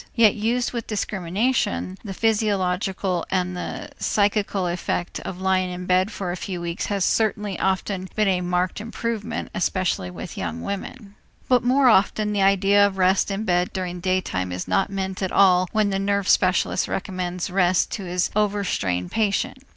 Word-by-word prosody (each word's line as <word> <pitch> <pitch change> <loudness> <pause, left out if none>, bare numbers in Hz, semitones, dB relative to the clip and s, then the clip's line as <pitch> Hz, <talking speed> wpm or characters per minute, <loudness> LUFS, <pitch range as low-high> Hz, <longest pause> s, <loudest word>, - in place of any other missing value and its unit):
Yet 225 -4 +6
used 235 +3 0
with 235 -2 -4
discrimination, 190 - -1
the 195 - -6
physiological 195 -4 0
and 180 -1 -1
the 180 - -6
psychical 205 -2 +1
effect 175 0 -2
of 180 - -7
lying 185 -1 +1
in 180 0 -6
bed 185 +2 +2
for 190 -3 -4
a - - -3
few 185 0 -5
weeks 170 0 -3
has 200 -3 0
certainly 210 -3 0
often 190 0 -1
been 215 -1 +2
a 185 -2 +2
marked 180 +2 -1
improvement, 225 -1 -4
especially 180 - -1
with 90 - -8
young 80 +1 -4
women. 200 +1 -6 0.3
But 250 -2 +3
more 260 +2 +4
often 210 -1 +3
the 200 - +1
idea 195 +1 +4
of 195 -1 -6
rest 185 +1 +3
in 200 +2 -2
bed 180 -3 +1
during 180 -2 -4
daytime 175 - -1
is 90 0 -4
not 195 - +1
meant 190 -1 -4
at 190 - -1
all 185 -2 +4
when 215 -2 +1
the 195 - 0
nerve 200 -1 0
specialist 185 -1 +2
recommends 180 -1 -3
rest 180 -1 +2
to 200 - -4
his 180 0 -1
over 205 -1 +1
strained 90 - -1
patient. 215 +4 0
190 Hz, 170 wpm, -23 LUFS, 180-205 Hz, 0.3 s, Yet